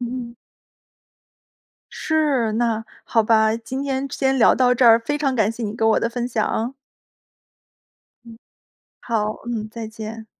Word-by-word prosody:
嗯。 240 -1 -5 1.6
是， 290 -8 0
那 225 -1 0 0.2
好 225 -2 +2
吧， 220 0 +3
今 255 +4 -5
天 275 0 -2
先 265 -1 0
聊 230 - +5
到 250 -1 +3
这 245 0 +2
儿， 230 0 +7
非 290 +6 -2
常 275 -3 0
感 215 -1 +2
谢 230 +1 -7
你 210 0 -4
给 225 - -3
我 220 - +4
的 230 - -1
分 240 0 -3
享。 230 +1 -1 1.5
嗯。 230 -1 -12 0.6
好， 215 -2 -2
嗯， 220 -3 -4
再 225 0 -7
见。 220 0 -8
235 Hz, 155 characters per minute, -21 LUFS, 220-255 Hz, 1.6 s, 儿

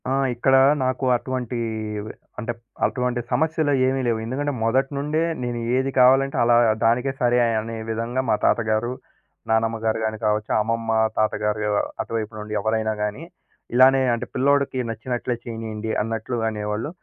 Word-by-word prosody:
ఆ! - - -1 0.2
ఇక్కడ 135 +3 +2 0.3
నాకు 130 +1 -1
అటువంటీ 125 -1 -3 0.5
వే 110 - -7 0.3
అంటే 120 0 -3 0.3
అటువంటి 125 -1 -1
సమస్యలయేవి 135 -2 +1
లేవు. 115 -2 +1
ఎందుకంటే 140 +5 -2
మొదటి 130 +5 +1
నుండే 150 +3 0 0.2
నేను 120 -1 -3 0.2
ఏది 130 +1 +1
కావాలంటే 135 +2 +5
అలా 120 0 +4 0.3
దానికే 120 +4 +2
సరే 120 0 +3 0.2
అనే 115 +1 -5
విధంగా 115 +3 -1
మా - - +4
తాతగారు, 110 +1 +1 0.6
నానమ్మగారు 110 0 +1
గాని 110 0 -2
కావచ్చు, 105 0 0
అమ్మమ్మ 115 +1 -1 0.3
తాతగారు 105 0 0
యవ్ 105 -1 +1 0.3
అటువైపు 110 -1 -4
నుండి 105 0 -6
ఎవ్వరైనా 110 0 0
గానీ, 105 +8 -3 0.5
ఇలానే 130 +1 +6
అంటే 115 - -2
పిల్లోడికి 140 0 +2
నచ్చినట్లే 120 +2 -3
చేయనీయండి 110 -2 -5
అన్నట్లు 115 +2 -3
అనేవాళ్ళు. 105 +4 -3
120 Hz, 135 wpm, -23 LUFS, 110-130 Hz, 0.6 s, ఇలానే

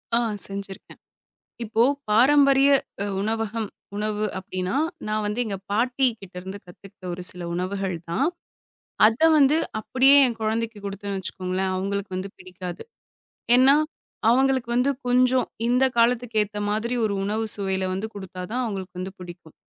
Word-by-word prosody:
ஆ, 235 - +4 0.3
செஞ்சிருக்கேன். 195 -1 -8 0.6
இப்போ 225 +1 +2 0.3
பாரம்பரிய 275 +4 +5 0.3
அ - - -2 0.2
உணவகம் 225 0 -2 0.3
உணவு 210 0 -1
அப்படின்னா, 185 +1 -4 0.3
நான் 215 0 -1
வந்து 210 +3 -2
எங்க 200 -3 -3
பாட்டி 250 +5 +1
கிட்ட 195 -2 -13
இருந்து 190 +2 -7
கத்துக்கிட்ட 185 +1 -15
ஒரு 180 +1 -6
சில 180 -1 -8
உணவுகள் 185 +1 -2
தான். 255 - +1 0.8
அதை 230 +9 +3
வந்து 290 +1 +5 0.2
அப்படியே 265 +5 +5
என் 235 -2 -3
குழந்தைக்குக் 220 -1 -2
கொடுத்தேன்னு 200 0 -4
வச்சுக்கோங்களேன், 185 +1 -3
அவங்களுக்கு 200 +1 -3
வந்து 185 +2 -4
பிடிக்காது. 180 -1 -8 0.7
ஏன்னா, 270 +3 +6 0.5
அவங்களுக்கு 260 -1 +2
வந்து 260 +3 +3 0.2
கொஞ்சம் 250 +1 +3 0.2
இந்தக் 255 +1 +3
காலத்துக்கேத்த 230 -3 +1
மாதிரி, 220 +4 -1
ஒரு 205 - 0
உணவு 215 +3 -1
சுவையில 190 -2 -1
வந்து 195 +4 -3
கொடுத்தா 190 -2 -7
தான் 255 +1 0
அவங்களுக்கு 190 -3 -5
பிடிக்கும். 175 -3 -12
210 Hz, 135 wpm, -24 LUFS, 190-245 Hz, 0.8 s, ஏன்னா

